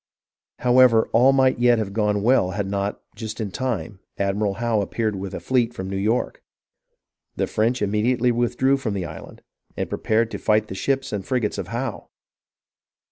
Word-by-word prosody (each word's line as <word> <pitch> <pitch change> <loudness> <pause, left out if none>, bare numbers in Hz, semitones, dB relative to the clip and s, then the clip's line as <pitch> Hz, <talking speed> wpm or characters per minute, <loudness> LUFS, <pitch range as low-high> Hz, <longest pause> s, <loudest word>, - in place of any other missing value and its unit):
However, 125 -2 +5
all 125 +4 +6
might 130 -2 +3
yet 120 -1 +4
have 105 -3 -3
gone 105 -1 0
well 120 -5 +3
had 100 - -1
not, 100 +1 -3
just 110 -1 -6
at 110 - -1
the - - -18
time, 120 -5 -3 0.2
Admiral 100 0 0
Howe 115 -2 0
appeared 110 +2 -2
with 95 0 -5
a - - -4
fleet 120 -2 0
from 95 -4 -5
New - - -3
York. 110 +5 -1 0.9
The - - 0
French 115 +1 0
immediately 115 +4 +1
withdrew 120 +3 +1
from 115 -7 -3
the 95 -3 -2
island, - - -10 0.3
and - - -2
pre - - -4
pared 115 +1 +1
to - - -5
fight 110 0 +1
the - - -5
ships 135 +7 -1
and 100 -2 -2
the - - -19
frigates 120 -6 -1
of 95 - -4
Howe. 120 -1 -4
110 Hz, 190 wpm, -23 LUFS, 100-125 Hz, 0.9 s, all